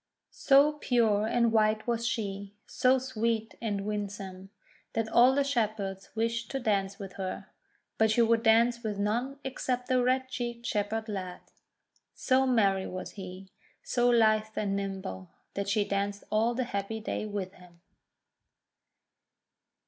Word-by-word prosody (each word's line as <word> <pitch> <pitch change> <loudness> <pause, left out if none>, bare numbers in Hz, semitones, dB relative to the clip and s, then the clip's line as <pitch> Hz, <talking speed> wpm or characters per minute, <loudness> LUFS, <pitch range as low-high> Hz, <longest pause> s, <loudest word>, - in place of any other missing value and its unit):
So 280 +2 +4
pure 220 -5 +2
and 235 0 +2
white 215 -1 +2
was 235 -1 -1
she, 200 -3 -4
so 255 +1 +3
sweet 230 -3 -2
and 205 -3 -2
win 205 -1 -2
some, 195 -1 -9 0.4
that 225 -1 0
all 245 +4 +5
the 280 - +3
Shepherds 215 -7 -2
wished 230 0 -1
to 270 - -2
dance 200 -4 0
with 195 -2 -9
her. 190 -1 -5 0.5
But 220 0 +4
she 235 +2 +4
would 230 0 +3
dance 235 +1 +4
with 215 -3 -3
none 235 +7 -1
ex 265 - -5
cept 250 0 -1
a 255 -1 +4
red 260 +1 +1
cheeked 240 -2 -5
Shepherd 220 0 -1
lad. 185 -4 -5 0.7
So 265 0 +2
merry 200 -6 +2
was 185 0 -6
he, 190 -1 -9 0.3
so 245 -1 +2
lithe 215 -2 +4
and 200 -2 -1
nimble, 190 - -5 0.2
that 200 0 -3
she 205 0 +2
danced 200 0 -2
all 225 +3 +2
the 255 - 0
happy 220 -1 -3
day 215 0 -3
with 200 -2 -4
him. 180 -2 -18
220 Hz, 150 wpm, -29 LUFS, 200-240 Hz, 0.7 s, all